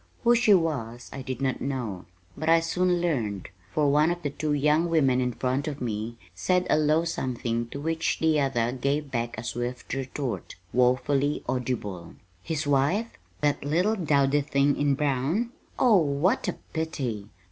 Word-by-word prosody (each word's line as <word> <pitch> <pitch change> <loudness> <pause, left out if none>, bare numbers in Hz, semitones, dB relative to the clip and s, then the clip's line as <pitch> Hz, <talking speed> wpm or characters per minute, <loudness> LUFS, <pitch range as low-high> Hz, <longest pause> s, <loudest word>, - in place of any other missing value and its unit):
Who 240 0 +6
she 230 -4 +5
was 125 -9 -2
I 135 - -6
did 130 +1 -4
not 130 -2 -1
know; 120 -9 -3 0.3
but 155 +2 -2
I 165 0 +6
soon 180 +1 +1
learned, 110 - -1 0.2
for 145 +3 +2
one 150 +3 +4
of 175 0 -3
the 145 - -1
two 150 +1 -1
young 150 +4 +2
women 135 -6 +3
in 125 0 0
front 130 +5 -1
of 145 -2 -4
me 115 -1 -3 0.2
said 180 -1 +1
a - - +6
low 155 +2 +3
something 120 -6 -2
to 140 - -6
which 160 +2 -1
the 160 -2 +2
other 120 -4 +1
gave 140 +3 -1
back 120 -2 -2
a 110 - -5
swift 120 +1 -4
retort, 135 -1 -4 0.2
woefully 130 +4 +2
audible: 105 -9 -3 0.3
"His 155 - -3
wife? 145 +12 +1 0.3
That 145 -1 +1
little 175 +9 +2
dowdy 145 -5 +2
thing 140 0 +2
in 145 -1 +2
brown? 150 - 0 0.3
Oh, 235 -5 +5
what 165 - +1
a 180 - 0 0.2
pity! 130 -11 -3
140 Hz, 170 wpm, -27 LUFS, 125-160 Hz, 0.3 s, Who